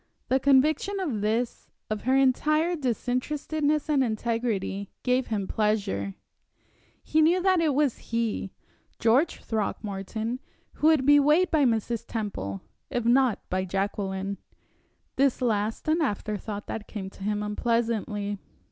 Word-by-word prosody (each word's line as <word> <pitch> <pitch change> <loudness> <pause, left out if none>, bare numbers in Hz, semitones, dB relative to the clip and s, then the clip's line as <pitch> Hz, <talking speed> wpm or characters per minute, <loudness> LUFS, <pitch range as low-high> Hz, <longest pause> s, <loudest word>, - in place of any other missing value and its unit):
The 265 - +3
conviction 290 +9 +3
of 275 - -2
this, 225 +3 -1 0.2
of 215 0 -4
her 260 +1 +3
entire 305 +6 +2
disinterestedness 290 +3 -1
and 290 -3 +3
integrity, 220 -4 -2
gave 255 0 +1
him 205 -4 -2
pleasure. 200 - -1 0.9
He 315 - +2
knew 335 +4 +4
that 375 -2 +4
it 305 -4 +2
was 285 -4 +1
he 230 -4 -1 0.5
George 255 +9 +2
Throckmorton 220 +2 -3 0.3
who 305 - +1
would 310 -5 +4
be 290 +1 +7
weighed 305 +6 +4
by 305 -4 +4
Mrs. 230 -1 0
Temple, 100 - -4 0.3
if 245 -2 -2
not 245 -1 +3
by 185 0 -1
Jacqueline; 195 +1 -2 0.8
this 275 -2 +3
last 220 -1 -1
an 320 +2 +2
afterthought 210 -4 -3
that 215 -2 -6
came 195 -3 -6
to - - -17
him 210 0 -1
unpleasantly. 210 -2 -1
235 Hz, 130 wpm, -27 LUFS, 210-285 Hz, 0.9 s, be